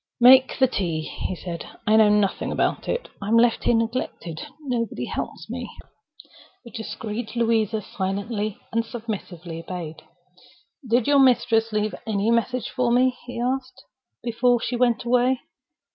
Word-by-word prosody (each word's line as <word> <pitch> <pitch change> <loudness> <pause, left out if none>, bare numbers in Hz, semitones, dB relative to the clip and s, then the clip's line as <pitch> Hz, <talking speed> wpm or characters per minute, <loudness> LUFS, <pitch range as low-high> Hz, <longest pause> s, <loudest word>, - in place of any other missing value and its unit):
"Make 255 +2 +7
the 265 - +5
tea," 175 -10 -1
he 170 +3 -4
said. 170 -1 -6 0.2
"I 215 0 +4
know 220 -1 +6
nothing 205 -2 +1
about - - 0
it. - - -2
I'm 215 +3 +2
left 235 0 +3
here 240 - +4
neglected. 225 -8 -2 0.2
Nobody 245 -6 -2
helps - - -5
me." - - -5 1.0
The 235 - -11
discreet 220 0 -5
Louisa 225 -2 +1
silently 205 +3 -3
and 230 0 +1
submissively 190 -8 -6
obeyed. 165 -2 -7 0.9
"Did 235 0 +3
your 285 -1 +4
mistress 235 -3 +4
leave 210 0 0
any 215 +1 +1
message 240 +2 0
for 250 -2 +1
me," 250 +1 +3
he 245 - -5
asked, 255 +1 -2 0.4
"before 240 +1 +2
she 245 - -2
went 240 -1 +2
away?" 250 +1 +2
230 Hz, 145 wpm, -24 LUFS, 210-245 Hz, 1.0 s, Make